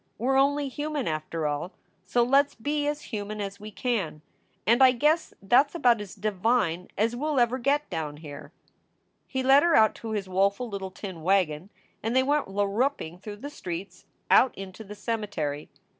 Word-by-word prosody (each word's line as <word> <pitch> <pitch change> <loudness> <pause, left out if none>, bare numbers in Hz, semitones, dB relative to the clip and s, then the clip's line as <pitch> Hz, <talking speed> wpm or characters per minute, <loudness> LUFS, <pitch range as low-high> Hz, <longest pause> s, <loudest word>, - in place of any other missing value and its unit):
We 245 +4 -1
re 270 0 +4
only 285 +1 +2
human, 295 0 -3
after 155 +1 -3
all, 150 +5 -2 0.3
so 235 +6 +2
let 275 +4 +4
s - - -22
be 290 +5 -1
as 295 0 -2
human 210 -2 -5
as 200 0 -5
we 210 +1 -8
can, 205 - -2 0.4
and 235 +4 +4
I 260 -1 +8
guess 300 +6 +2
that 245 +8 +5
s 285 - -18
about 240 -9 +3
as 200 -3 -8
divine 200 -3 0
as 225 +3 +1
we 250 - -5
ll 305 -3 +1
ever 240 +2 +2
get 285 +4 +1
Down 155 -3 -3
Here." 145 -1 -10 0.8
He 260 -1 -2
led 270 +2 +6
her 340 +1 +3
out 220 0 +5
to 225 - -5
his 200 -3 -2
woeful 200 +6 +1
little 200 -3 -5
tin 185 -3 -8
wagon 180 -1 +1 0.3
and 225 +3 -2
they 260 - +5
went 290 +2 +1
larruping 200 - -1
through 205 +1 -7
the 290 - -5
streets, 180 - -7 0.2
out 260 - +5
into 195 +2 -8
the 210 0 -10
cemetery. 205 -11 -3
215 Hz, 190 wpm, -27 LUFS, 185-265 Hz, 0.8 s, I